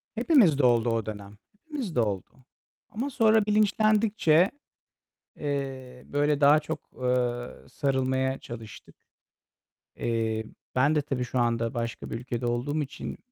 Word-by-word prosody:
Hepimizde 220 - +4
oldu 120 -1 +3
o 115 -2 0
dönem. 105 -1 -8 0.2
Hepimizde 260 - -4
oldu. 100 -5 -1 0.6
Ama 255 +6 -3
sonra 220 -4 +3
bilinçlendikçe, 210 -4 +3 0.9
eee, 135 -3 -4
böyle, 145 0 +1
daha 145 +2 +7
çok, 160 +1 -4 0.2
ııı, 125 -1 -2
sarılmaya 130 -1 0
çalıştık. 115 -2 -10 1.0
Eee, 110 -1 -1 0.3
ben 140 +5 +3
de 150 - +3
tabii 135 -3 -2
şu 125 +1 -2
anda 115 0 0
başka 115 -2 -4
bir - - -4
ülkede 120 0 -4
olduğum 130 +6 -1
için 135 - -6
130 Hz, 120 wpm, -27 LUFS, 120-160 Hz, 1.0 s, daha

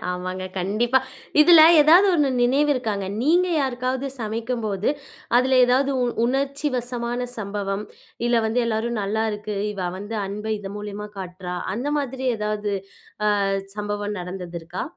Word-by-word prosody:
ஆமாங்க, 185 +1 -4
கண்டிப்பா. 225 +8 +2 0.4
இதுல 330 +1 +8 0.2
ஏதாது 345 +7 +7
1 295 -4 +3
நினைவு 280 +4 +3
இருக்காங்க. 215 -6 -2 0.2
நீங்க 350 +6 +3
யாருக்காவது 260 -1 -1
சமைக்கும்போது 220 -2 -2 0.5
அதுல 255 +1 +4
ஏதாது 265 +3 +2
உ - - +2 0.2
உணர்ச்சிவசமான 250 -2 -1 0.2
சம்பவம். 200 0 -3 0.4
"இல்ல 240 -1 +3
வந்து 225 +3 +1
எல்லாரும் 230 0 -1
நல்லா 215 +3 -1
இருக்கு. 210 0 -5 0.2
இவ 185 -3 -3
வந்து 205 +3 -5
அன்ப 210 +2 -6
இதன் 200 0 -7
மூலியமா 210 0 -6
காட்டுறா." 180 -1 -6 0.2
அந்த 255 +7 -2
மாதிரி 265 -1 -3
ஏதாது 210 -1 -2 0.7
அ - - +1 0.3
சம்பவம் 205 0 -3
நடந்தது 180 -1 -6
இருக்கா? 170 +3 -5
220 Hz, 130 wpm, -23 LUFS, 200-255 Hz, 0.7 s, இதுல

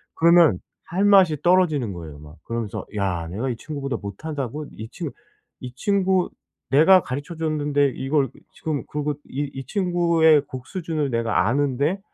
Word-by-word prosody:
그러면 165 - +5 0.3
할 190 +4 0
맛이 190 -7 +5
떨어지는 160 - +3
거예요 80 -4 -9
막. 75 +2 -13
그러면서 115 -3 -4
'야 90 -5 -1
내가 110 +10 -3
이 120 - -2
친구보다 140 -3 -4
못하다고? 140 +6 -5
이 110 +1 -9
친 - - -5 0.5
이 125 -1 -7
친구 190 +3 +1 0.4
내가 170 +7 +7
가르쳐 145 +6 -5
줬는데 150 -3 +1
이걸 135 0 0 0.2
지금 155 -3 -3
그리고 150 0 -2 0.2
이 145 +1 -3
이 135 -1 -7
친구의 170 - +3
곡 130 0 -8
수준을 160 -6 -3
내가 115 -5 +1
아는데 145 - +1
145 Hz, 315 characters per minute, -23 LUFS, 120-165 Hz, 0.5 s, 내가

